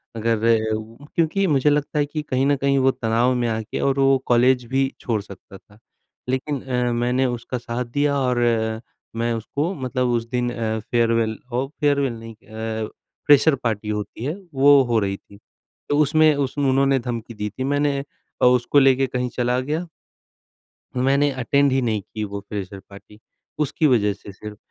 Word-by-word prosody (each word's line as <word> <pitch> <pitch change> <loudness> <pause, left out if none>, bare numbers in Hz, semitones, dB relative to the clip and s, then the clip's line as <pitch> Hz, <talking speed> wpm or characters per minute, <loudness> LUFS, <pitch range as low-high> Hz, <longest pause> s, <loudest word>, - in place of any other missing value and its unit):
अगर 115 0 +1
उ 115 +5 -9
क्योंकि 170 +4 +1
मुझे 150 -2 +3
लगता 150 +1 0
है 145 - +2
कि 155 +1 -4
कहीं 130 -2 0
न 145 - +3
कहीं 140 0 +1
वो 135 0 +4
तनाव 115 +1 +1
में 120 -1 0
आके 110 -1 -3
और 140 0 +1
वो 135 0 +4
कॉलेज 125 +1 +3
भी 135 +2 0
छोड़ 110 -3 -1
सकता 100 -1 -13
था। 105 +2 -23 0.5
लेकिन 130 +1 -2
अ, 125 -2 -1
मैंने 125 +2 +1
उसका 120 0 -3
साथ 120 +1 -4
दिया 145 +4 0
और 125 -2 0 0.8
मैं 115 +1 0
उसको 145 - -2
मतलब 130 -2 -1
उस 115 -1 -1
दिन 125 0 -1
अ, 110 -2 -2
फेयरवेल 115 0 0
हो 125 +3 -1
फेयरवेल 140 -4 +1
नहीं 115 -1 -10
अ, 110 0 -5 0.4
फ्रेशर 145 +1 +6
पार्टी 110 -5 -3
होती 105 +2 -4
है 145 - -1 0.2
वो 140 +1 +6
हो 120 -2 0
रही 100 -1 -2
थी। 100 - -18 0.5
तो 145 - +2
उसमें 155 +1 +4
उस 140 0 -2
उन्होंने 135 -1 +3
धमकी 120 -1 -5
दी 105 -1 -4
थी। 130 - -6
मैंने 145 +1 +1 0.4
अ, - - +5
उसको 125 +3 +4
लेके 135 -1 +4
कहीं 125 -1 -2
चला 125 0 +1
गया 155 +7 -2 1.1
मैंने 135 +3 +2
अटेंड 140 +2 +1
ही 135 +1 +2
नहीं 110 -4 -1
की 110 +2 -7
वो 100 0 -5
फ्रेशर 100 -1 -5
पार्टी, 100 +1 -15 0.4
उसकी 150 +1 +1
वजह 105 -6 +3
से 100 0 -12
सिर्फ। 105 +2 -10
125 Hz, 175 wpm, -22 LUFS, 115-140 Hz, 1.1 s, फ्रेशर